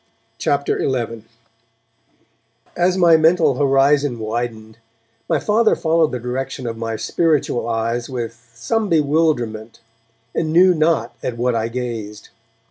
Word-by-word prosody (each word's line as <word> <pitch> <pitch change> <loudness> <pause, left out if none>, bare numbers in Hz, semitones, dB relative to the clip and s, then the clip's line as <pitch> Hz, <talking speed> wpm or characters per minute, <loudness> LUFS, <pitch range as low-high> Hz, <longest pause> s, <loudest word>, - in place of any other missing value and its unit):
CHAPTER 140 0 0
XI 115 -4 -2 1.5
As 180 +2 +1
my 170 -3 +6
mental 160 -2 +3
horizon 140 -1 +2
widened, 110 0 -5 0.5
my - - +2
Father 215 +1 +2
followed 160 -1 +1
the 125 - -2
direction 125 +2 -4
of 115 -1 -3
my 115 0 -4
spiritual 145 -2 0
eyes 115 +2 -2
with 120 -2 -6
some 210 - -1
bewilderment, 145 -9 0 0.5
and 160 -1 -1
knew 180 +3 +5
not 155 -7 0
at 120 - -4
what 125 +1 0
I 115 -1 -1
gazed. 115 -4 -6
125 Hz, 125 wpm, -19 LUFS, 115-160 Hz, 1.5 s, my